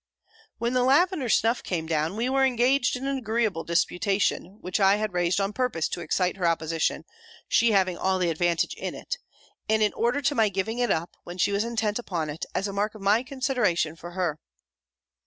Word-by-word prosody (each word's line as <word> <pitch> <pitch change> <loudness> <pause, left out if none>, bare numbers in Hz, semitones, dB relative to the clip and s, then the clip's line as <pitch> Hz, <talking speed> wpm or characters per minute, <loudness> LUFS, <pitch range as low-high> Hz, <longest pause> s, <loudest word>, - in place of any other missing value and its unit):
"When 235 +1 -1
the 255 - +3
lavender 280 +1 +3
snuff 230 +2 +2
came 165 -3 -3
down, 160 +2 -1
we 230 +3 -1
were 270 +1 +2
engaged 255 +1 +2
in 255 +2 -5
an 275 -1 -1
agreeable 220 -6 -1
disputation, 190 +2 0
which 185 +3 -2
I 195 0 +5
had 215 -2 -2
raised 175 +1 +1
on 200 +1 -1
purpose 250 -11 0
to 175 - -4
excite 180 +3 0
her 180 -3 +1
opposition, 165 -1 0 0.4
she 235 0 +3
having 185 -3 +2
all 190 0 +1
the 175 -2 +1
advantage 170 +1 0
in - - -5
it; - - -5 0.5
and 220 0 +3
in 210 - +2
order 240 +4 +1
to 280 +1 +2
my 225 -5 +3
giving 200 +5 -2
it 245 -1 +1
up, 170 -1 -1
when 175 +1 -8
she 195 - +2
was 200 +1 +1
intent 225 -2 -1
upon 170 -9 -3
it, 150 - -6
as 195 - 0
a 200 - -5
mark 210 +2 -1
of 215 - -11
my 205 +4 +4
consideration 250 - 0
for 175 +1 -10
her." 175 -4 -1
205 Hz, 205 wpm, -26 LUFS, 175-240 Hz, 0.5 s, I